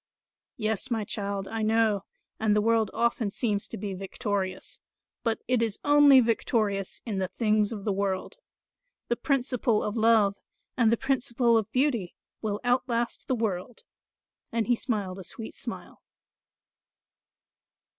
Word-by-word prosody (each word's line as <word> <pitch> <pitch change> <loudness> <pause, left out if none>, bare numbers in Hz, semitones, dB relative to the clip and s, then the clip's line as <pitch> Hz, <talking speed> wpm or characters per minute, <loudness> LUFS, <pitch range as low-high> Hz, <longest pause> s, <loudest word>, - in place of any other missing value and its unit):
"Yes, 220 +2 -1
my 225 -3 0
child, 200 -1 -3
I 225 0 -3
know, 220 -2 +2 0.3
and 215 -1 +2
the 210 - +3
world 225 -1 +2
often 235 -2 0
seems 205 -1 -1
to - - -7
be 200 0 -4
victorious; 195 0 -3 0.4
but 230 -2 -1
it 250 -2 +2
is 225 -3 0
only 290 -2 +7
victorious 215 -4 0
in 205 -4 -2
the 190 - 0
things 215 0 +1
of 205 -3 -6
the 205 - +1
world. 195 - -2 0.7
The 240 - +2
principle 250 -4 0
of 210 - -2
love 220 -3 +4 0.4
and 230 -3 +4
the 230 - +3
principle 245 -3 +1
of 220 -1 +1
beauty 250 -9 0 0.3
will 210 -2 -2
outlast 245 -1 0
the 260 - +1
world," 220 -1 -3 0.7
and 230 -1 0
he 245 - +3
smiled 200 -6 -3
a - - -7
sweet 220 +6 -7
smile. - - -7
220 Hz, 145 wpm, -27 LUFS, 200-235 Hz, 0.7 s, only